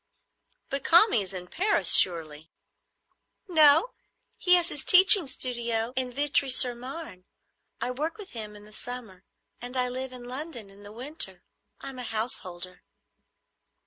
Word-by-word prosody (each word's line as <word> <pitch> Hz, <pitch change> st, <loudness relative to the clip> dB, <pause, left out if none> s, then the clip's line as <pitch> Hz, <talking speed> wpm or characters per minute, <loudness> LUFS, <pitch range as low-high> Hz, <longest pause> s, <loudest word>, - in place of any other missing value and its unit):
"But 275 Hz, -1 st, -4 dB
Kami 345 Hz, -, +4 dB
is 190 Hz, -1 st, -7 dB
in 180 Hz, -2 st, -8 dB
Paris 400 Hz, -, 0 dB
surely?" 160 Hz, -3 st, 0 dB, 1.0 s
"No; 315 Hz, +5 st, +4 dB, 0.5 s
he 360 Hz, -1 st, +4 dB
has 350 Hz, -1 st, +2 dB
his 290 Hz, -, -3 dB
teaching 370 Hz, -2 st, +8 dB
studio 235 Hz, -2 st, -1 dB
in 255 Hz, -1 st, -3 dB
Vitry 280 Hz, +1 st, 0 dB
sur 250 Hz, -1 st, +5 dB
Marne. 250 Hz, -, -10 dB, 0.5 s
I 250 Hz, -, -3 dB
work 305 Hz, +10 st, -5 dB
with 415 Hz, -3 st, -11 dB
him 215 Hz, -3 st, -8 dB
in 205 Hz, 0 st, -14 dB
the 215 Hz, -, -15 dB
summer, 225 Hz, -7 st, -6 dB, 0.4 s
and 245 Hz, +2 st, -4 dB
I 250 Hz, 0 st, +2 dB
live 260 Hz, +1 st, -6 dB
in 250 Hz, -1 st, -11 dB
London 250 Hz, -4 st, -4 dB
in 200 Hz, +1 st, -18 dB
the 205 Hz, 0 st, -13 dB
winter. 265 Hz, +8 st, -5 dB, 0.4 s
I'm 265 Hz, -2 st, -9 dB
a -, -, -4 dB
householder." 185 Hz, -6 st, -6 dB
250 Hz, 145 wpm, -26 LUFS, 210-295 Hz, 1.0 s, teaching